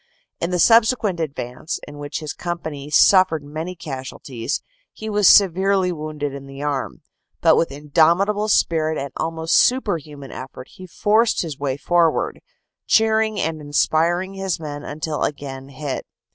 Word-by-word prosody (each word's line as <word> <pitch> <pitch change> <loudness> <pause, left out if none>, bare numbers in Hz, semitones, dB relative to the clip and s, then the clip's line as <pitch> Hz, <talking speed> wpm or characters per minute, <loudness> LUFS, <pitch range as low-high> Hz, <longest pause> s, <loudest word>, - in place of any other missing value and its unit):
In 170 - -1
the 180 - 0
subsequent 225 -2 +4
advance, 145 -1 -4
in 145 0 -10
which 145 +2 -5
his 155 -2 -5
company 160 -5 -5
suffered 185 -1 +5
many 160 +5 -6
casualties, 135 -4 -5 0.3
he 220 0 -7
was 205 -2 +3
severely 190 0 +5
wounded 150 -3 -4
in 140 0 -8
the 135 +1 -8
arm, 145 -3 -3 0.4
but - - +5
with 165 - +1
indomitable 170 +9 +2
spirit 160 -5 +2
and 140 -1 -4
almost 165 0 -1
superhuman 160 - 0
effort 130 0 -9
he 185 - -12
forced 215 +5 +2
his 155 -5 -6
way 140 -2 -2
forward, 170 +1 +1 0.5
cheering 220 -1 +3
and 160 -1 -2
inspiring 165 +5 +1
his 195 -3 -3
men 145 -2 -6
until 150 +1 -4
again 135 -2 -4
hit. 140 0 -5
160 Hz, 145 wpm, -21 LUFS, 145-185 Hz, 0.5 s, suffered